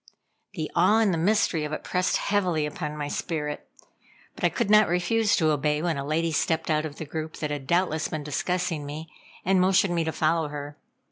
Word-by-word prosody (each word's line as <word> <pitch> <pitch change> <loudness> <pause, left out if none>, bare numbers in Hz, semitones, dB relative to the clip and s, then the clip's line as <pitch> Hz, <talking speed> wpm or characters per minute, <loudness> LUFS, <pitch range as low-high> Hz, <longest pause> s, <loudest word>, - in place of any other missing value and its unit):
The 155 -4 -4
awe 185 +6 +5
and 220 -4 +3
the - - 0
mystery 180 -3 +2
of 150 0 -4
it - - -4
pressed 180 0 +1
heavily 180 -7 0
upon 150 0 -5
my 145 -1 -3
spirit, 150 -1 -4 0.6
but - - -12
I - - +5
could - - -1
not 215 -1 +7
refuse 205 +5 +2
to 160 -2 +2
obey 150 0 +1
when 165 0 0
a - - -3
lady 160 +3 0
stepped 160 +2 0
out 155 0 +1
of 145 - -11
the 160 - -6
group, 155 +1 -5
that 150 -1 -3
had 140 -2 -5
doubtless 170 -2 +1
been 155 -2 -4
discussing 170 +2 -2
me, 150 +2 -7 0.3
and 190 0 +3
motioned 185 0 +3
me 170 -1 +1
to 160 - -1
follow 160 0 +1
her. 145 0 -7
160 Hz, 210 wpm, -26 LUFS, 150-180 Hz, 0.6 s, not